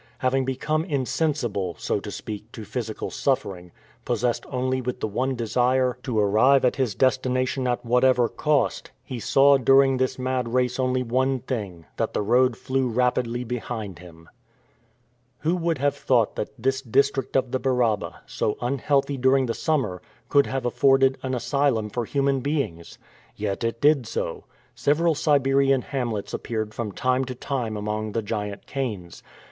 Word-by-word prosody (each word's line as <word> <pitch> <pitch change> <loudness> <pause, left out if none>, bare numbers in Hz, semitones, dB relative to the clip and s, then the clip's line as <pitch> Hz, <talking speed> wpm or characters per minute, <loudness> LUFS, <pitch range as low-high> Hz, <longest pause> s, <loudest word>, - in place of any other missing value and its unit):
Having 130 +1 +1
become 150 +4 -1
insensible, 130 - -1
so - - -1
to - - -8
speak, 110 +1 -7
to 110 - -8
physical 110 -1 -4
suffering, 95 -10 -2 0.3
possessed 120 0 -1
only 130 0 -1
with 125 0 -4
the - - -1
one 130 +5 -1
desire 125 +2 +1
to 125 -4 -3
arrive 110 +7 +4
at 125 - +1
his 125 -7 0
destination 130 0 +1
at 120 0 -1
whatever 125 0 +4
cost, 150 +1 0
he 125 -3 -6
saw 140 +4 +5
during 135 +1 +5
this 130 0 0
mad 130 -2 -2
race 125 0 +1
only 130 0 +1
one 130 +3 +1
thing 100 -10 -5
that - - -2
the - - +1
road 125 +3 +3
flew 130 -1 -1
rapidly 125 0 0
behind 115 -5 -5
him. 85 -2 -14 1.1
Who 165 +4 +1
would 165 -2 0
have 145 +1 +1
thought 120 -5 +1
that - - -3
this 130 +3 0
district 135 +1 +1
of 130 -2 +1
the 130 - 0
Baraba, 125 -6 0
so 105 - -2
unhealthy 140 +2 0
during 130 +1 +3
the 115 - -1
summer, 120 - -1 0.3
could 140 -1 +4
have 135 -2 -3
afforded 135 +1 +3
an 130 -1 -2
asylum 125 -4 0
for 120 +1 -2
human 140 +2 +1
beings? 130 - -3 0.4
Yet 105 +1 -3
it 115 0 -2
did 145 -4 +3
so. - - -4 0.3
Several 160 +3 +2
Siberian 135 -3 +2
hamlets 120 -7 -3
appeared 110 -2 -3
from 115 -3 -4
time 130 +5 0
to 130 0 -6
time 120 -5 -3
among 105 0 -3
the 115 - -1
giant 105 -1 -4
canes. 105 -11 -5
125 Hz, 160 wpm, -24 LUFS, 115-135 Hz, 1.1 s, saw